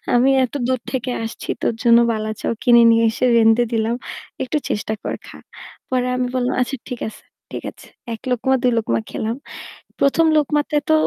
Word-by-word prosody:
আমি 255 +3 +4 0.2
এত - - -14
দূর 255 -1 0
থেকে 255 -1 -2
আসছি, 225 - -7
তোর - - +1
জন্য 235 -1 +6
'বালাচাও' 215 0 -3
কিনে 235 -1 +6
নিয়ে 230 0 +4
এসে 255 - -1
রেধে 225 +1 +5
দিলাম, 225 +1 0 0.5
একটু 260 +4 -1
চেষ্টা 215 +1 -2
কর, - - -3
খা।" - - -11 0.5
পরে 250 -1 0
আমি 250 0 0
বললাম, 250 0 0
"আচ্ছা 270 +2 -1
ঠিক 250 -3 -5
আছে, 220 - -10 0.3
ঠিক - - -6
আছে।" - - -17 0.3
১ 225 - -8
লোকমা 250 +2 +1
২ 250 - +4
লোকমা 115 - 0
খেলাম। 225 +2 -3 0.6
প্রথম 300 +4 +3
লোকমাতে 295 +1 0
তো 315 - +5
240 Hz, 180 wpm, -20 LUFS, 225-255 Hz, 0.6 s, জন্য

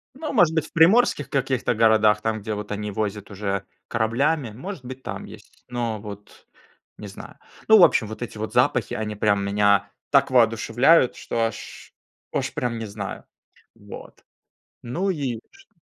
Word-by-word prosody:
Ну, 305 +2 -5
может 175 - +4
быть, 160 -2 0
в - - -19
приморских 165 - +4
каких-то 130 -3 0
городах, 110 -1 +4
там, 110 0 -2
где 105 +1 -4
вот 105 0 -6
они 105 0 -4
возят 105 0 -4
уже 100 -1 -3 0.2
кораблями, 120 +4 0
может 135 - -8
быть, 130 +1 -9
там 100 -5 -6
есть, - - -15
но 120 -3 -3
вот 105 -1 -11 0.5
не - - -8
знаю. - - -11 0.3
Ну, 220 - +8
в 180 - +9
общем, 110 - +3
вот 110 +1 -8
эти 115 - -6
вот 110 +1 -5
запахи, 125 -3 +1
они 105 -1 -3
прям 100 -1 +1
меня 100 0 +2 0.2
так 140 -1 +4
воодушевляют, 120 +4 +3
что 115 -1 -2
аж 110 - -9 0.4
аж - - -2
прям 120 -2 -2
не 115 - -5
знаю. 100 -1 -7 0.5
Вот. - - -12 0.6
Ну 175 +11 -2
и 135 -9 -2
чт 395 0 -21
115 Hz, 165 wpm, -23 LUFS, 105-135 Hz, 0.6 s, в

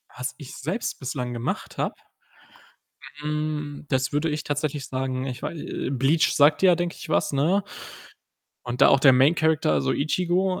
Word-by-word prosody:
Was 125 +1 -4
ich 145 -3 -10
selbst 170 - -3
bislang 125 -2 -4
gemacht 120 0 -4
habe, - - -2 1.3
hm, 150 -1 -3
das 130 0 0
würde 150 +3 +1
ich 150 0 -3
tatsächlich 145 -1 -2
sagen, 130 0 -3
ich 125 -2 -5
wei - - -3
äh, 150 - -4
Bleach 140 +5 +2
sagt 145 +1 +5
dir 190 - +6
ja, 175 - +6
denke 175 0 -3
ich, - - -10
was, - - +1
ne, 170 +9 +2 1.0
und 125 +1 -5
da - - +8
auch 135 - +5
der 135 -2 +7
Main 135 +5 +5
Character, 160 - +2
also 70 -3 +1
Ichigo, 180 +5 0
145 Hz, 175 wpm, -24 LUFS, 130-160 Hz, 1.3 s, da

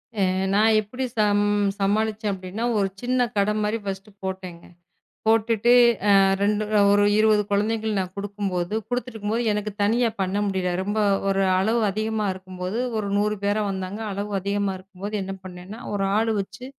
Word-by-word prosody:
அ, - - -4 0.3
நான் 215 +2 +4
எப்படி 245 +5 -6 0.2
சம்-சமாளிச்சேன் 205 +1 +1
அப்படின்னா 190 +4 -4
ஒரு 195 - +2
சின்னக் 245 -1 0
கடை 200 +1 +2
மாரி 210 +2 0
ஃபர்ஸ்ட் 195 +1 -5
போட்டேங்க. 185 -3 -6 0.6
போட்டுட்டு, 225 +1 +3 0.4
அ, - - +6 0.3
2 210 +1 +1 0.3
ஒரு 205 0 +4
20 215 -1 +4
குழந்தைகளுக்கு 215 +1 0
நான் 185 -1 -4
கொடுக்கும்போது, 200 -2 -3
கொடுத்து 245 0 -2
இருக்கும்போது 220 +2 -2
எனக்குத் 210 0 -4
தனியா 230 +4 +3
பண்ண 190 +1 -1
முடியல. 190 -2 -1
ரொம்ப 205 +3 -2 0.3
ஒரு 195 0 +2 0.2
அளவு 220 +5 +2
அதிகமா 215 +1 -1
இருக்கும்போது 185 +2 -6 0.2
ஒரு 205 -2 -2
100 210 +1 +1
பேரா 205 +1 +1
வந்தாங்க. 190 +2 -5
அளவு 200 +2 -4
அதிகமா 200 0 -1
இருக்கும்போது 195 +2 -7
என்ன 195 0 -5
பண்ணேன்னா 185 +4 -9
ஒரு 195 -1 0
ஆள் 225 +1 +1
வச்சு, 195 +5 -8
205 Hz, 150 wpm, -24 LUFS, 195-215 Hz, 0.6 s, அ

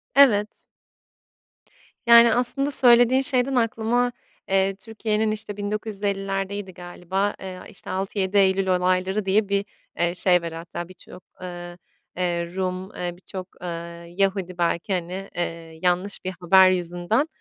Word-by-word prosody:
Evet. 215 -7 +4 1.4
Yani, 235 -1 +8
aslında 275 +4 +2
söylediğin 245 0 +5
şeyden 265 -1 +3
aklıma, 235 +1 +1 0.4
eee, 195 0 +2
Türkiye'nin, 215 +1 -2
işte, 215 -1 -5
1950'lerdeydi 200 -2 -3
galiba. 180 +3 -3
Eee, 190 -1 -7
a 180 - -12
işte, - - -13
6-7 195 +1 -1
Eylül 190 0 +3
Olayları 185 +2 +1
diye 200 +1 +1
bir, 200 0 0 0.3
eee, 175 0 +1
şey 180 -1 +4
var 170 - -5
hatta 170 +1 -7
birçok, 185 0 -14 0.2
eee, 175 -1 -8 0.4
eee, 170 -1 -2
Rum, 185 +1 -3
eee, 175 0 -3
birçok, 185 0 -8
eee, 180 - -6 0.5
Yahudi 195 -2 0
belki, 170 +3 -1
hani, 185 +2 -4
eee, 165 -2 -5
yanlış 180 +3 -1
bir 185 - -2
haber 190 +2 +6
yüzünden, 180 - 0
195 Hz, 130 wpm, -23 LUFS, 180-215 Hz, 1.4 s, Yani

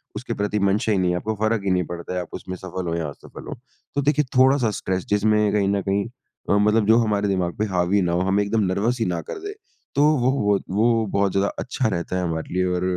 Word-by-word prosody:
उसके - - -4
प्रति 105 +1 -1
मंशा 100 +2 +1
ही 105 - +2
नहीं 90 -1 +1
है, 90 - 0
आपको 110 +5 -3
फ़र्क 110 -2 +1
ही 95 - +1
नहीं 90 0 +2
पड़ता 85 +1 -6
है, 90 - -1
आप 90 - -8
उसमें 95 - -6
सफल 95 0 -5
हों 85 - -1
या 80 -2 -2
असफल 70 - -12
हों। - - -5 0.4
तो 140 - +2
देखिए 150 +1 +2
थोड़ा-सा 130 -3 +4
स्ट्रेस 95 -1 -2
जिसमें 105 0 +2
कहीं 100 -2 +2
न 100 0 +1
कहीं 100 +1 -1 0.4
अ, - - +4
मतलब 105 +1 +3
जो 110 - +6
हमारे 105 -3 +1
दिमाग 90 -3 -1
पे 110 - 0
हावी 95 +1 +1
ना 90 -2 0
हो, 85 - +1
हमें 95 +2 +2
एकदम 105 +1 0
नर्वस 105 +7 0
ही 115 - +1
ना 90 -2 -1
कर - - -7
दे। 410 +1 -6 0.4
तो 145 - +4
वो 125 +1 +2 0.2
व - - +5
वत 100 - -3
वो 115 +3 +2
बहुत 100 -1 +1
ज़्यादा 100 +1 +1
अच्छा 130 -2 -1
रहता 90 -1 -3
है 90 - -1
हमारे 80 -1 -3
लिए 90 0 +2
और, 90 - -2
100 Hz, 260 wpm, -23 LUFS, 90-110 Hz, 0.4 s, जो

